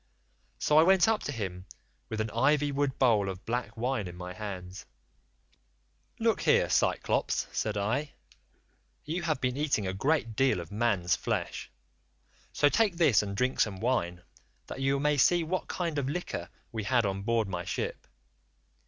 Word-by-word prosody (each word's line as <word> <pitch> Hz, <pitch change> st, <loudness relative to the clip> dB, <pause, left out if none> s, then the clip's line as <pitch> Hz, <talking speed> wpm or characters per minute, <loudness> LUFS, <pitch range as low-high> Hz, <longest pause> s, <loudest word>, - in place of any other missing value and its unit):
So 150 Hz, +1 st, +4 dB
I -, -, +8 dB
went 185 Hz, +2 st, +5 dB
up 220 Hz, -1 st, +2 dB
to -, -, -2 dB
him 95 Hz, -6 st, -5 dB, 0.4 s
with 110 Hz, -, -4 dB
an 110 Hz, -1 st, -3 dB
ivy 145 Hz, +4 st, +2 dB
wood 140 Hz, -1 st, -1 dB
bowl 110 Hz, -6 st, +3 dB
of 95 Hz, 0 st, -7 dB
black 115 Hz, -1 st, -3 dB
wine 120 Hz, -4 st, -1 dB
in 90 Hz, -, -8 dB
my 90 Hz, 0 st, -7 dB
hands: 95 Hz, -3 st, -7 dB, 1.3 s
"'Look -, -, +1 dB
here, -, -, +3 dB
Cyclops,' -, -, +1 dB
said 105 Hz, -1 st, -2 dB
I, 125 Hz, +9 st, -1 dB, 0.9 s
you 165 Hz, +4 st, -2 dB
have 155 Hz, -5 st, -1 dB
been 125 Hz, -1 st, -1 dB
eating 140 Hz, -8 st, 0 dB
a 95 Hz, -, -2 dB
great 120 Hz, +1 st, 0 dB
deal 135 Hz, -5 st, +2 dB
of 85 Hz, -2 st, -8 dB
man's 100 Hz, -5 st, +1 dB
flesh, -, -, -3 dB, 0.8 s
so 145 Hz, -, +3 dB
take 200 Hz, +3 st, +2 dB
this 155 Hz, -10 st, +5 dB
and 100 Hz, -1 st, -5 dB
drink 125 Hz, +3 st, 0 dB
some 100 Hz, -4 st, +1 dB
wine, 90 Hz, -8 st, -1 dB, 0.4 s
that 135 Hz, -, -7 dB
you 135 Hz, +1 st, +2 dB
may 150 Hz, +1 st, +2 dB
see 170 Hz, +5 st, +4 dB
what 180 Hz, +3 st, -2 dB
kind 170 Hz, -5 st, -2 dB
of 135 Hz, -1 st, -2 dB
liquor 175 Hz, +4 st, -4 dB, 0.2 s
we 110 Hz, -, -3 dB
had 120 Hz, -2 st, +2 dB
on 100 Hz, 0 st, -2 dB
board 115 Hz, 0 st, +1 dB
my 90 Hz, -2 st, -4 dB
ship. -, -, -4 dB
120 Hz, 170 wpm, -29 LUFS, 100-145 Hz, 1.3 s, I